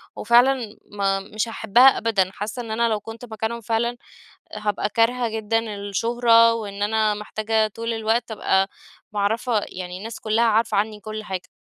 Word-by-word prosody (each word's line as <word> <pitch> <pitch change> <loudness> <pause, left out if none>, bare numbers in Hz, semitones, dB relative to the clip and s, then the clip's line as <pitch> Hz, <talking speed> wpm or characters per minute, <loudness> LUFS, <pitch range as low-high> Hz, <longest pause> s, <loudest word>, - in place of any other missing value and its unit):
وفعلًا 240 -2 +3
ما 195 -1 0
مش 210 +3 -3
هاحبها 235 +4 +5
أبدًا. 200 -5 +1
حاسة 210 +4 -5
إن 230 -2 -7
أنا 230 +1 +1
لو 215 -2 0
كنت 225 +3 -9
مكانهم 220 +1 -4
فعلًا، 230 +2 -1 0.6
هابقى 210 -1 -1
كارهة 235 +3 +1
جدًا 220 0 -1 0.2
الشهرة، 230 +3 +3
وإن 205 -3 -5
أنا 215 0 +2
محتاجة 215 +1 -1
طول 230 +2 -4
الوقت 225 +1 0
أبقى 195 -2 +1 0.4
معرِّفة 220 +3 0
يعني 180 0 -7
الناس 220 +3 -8
كلها 220 +2 +1
عارفة 225 0 +2
عني 210 +1 -1
كل 215 +1 -6
حاجة. 190 -2 -5
220 Hz, 155 wpm, -23 LUFS, 210-230 Hz, 0.6 s, هاحبها